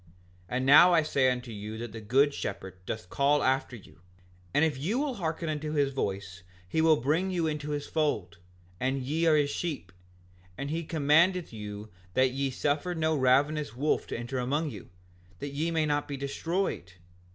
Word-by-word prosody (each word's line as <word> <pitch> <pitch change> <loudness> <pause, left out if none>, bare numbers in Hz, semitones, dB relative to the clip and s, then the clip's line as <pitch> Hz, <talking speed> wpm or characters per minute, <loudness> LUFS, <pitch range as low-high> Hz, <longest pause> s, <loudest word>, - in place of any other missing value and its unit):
5:60 90 - -29 0.4
And 130 +1 -1
now 165 +6 +8
I 160 - +4
say 135 -4 +2
unto 125 -1 -3
you 105 +1 -6
that 115 -1 -6
the 115 - -8
good 135 +7 +3
shepherd 95 -5 -6
doth 110 -4 -4
call 145 +1 +2
after 130 -1 +1
you; 100 -6 -15 0.5
and 145 - +3
if 155 - 0
you 170 - -1
will 285 -1 0
hearken 165 -5 -3
unto 155 0 -3
his 140 -2 +1
voice 95 -6 -3 0.3
he 160 - 0
will 160 -1 +6
bring 155 +9 +1
you 175 -3 0
into 150 -1 -3
his 145 -1 -2
fold, 105 - -1 0.4
and 130 +1 -1
ye 160 +5 0
are 160 - +5
his 145 -1 +2
sheep; 145 - -4 0.7
and 140 +1 -4
he 165 +1 -2
commandeth 165 +2 +3
you 105 0 -7 0.3
that 130 0 +4
ye 135 +1 -1
suffer 145 +6 -1
no 160 -1 +1
ravenous 140 0 +2
wolf 145 +5 0
to - - -4
enter 120 +2 -4
among 145 +5 -1
you, 100 -5 -10 0.5
that 145 - -5
ye 155 +4 -1
may 160 -2 +1
not 145 -1 0
be 140 - -4
destroyed. 140 - -2
145 Hz, 190 wpm, -29 LUFS, 125-155 Hz, 0.7 s, now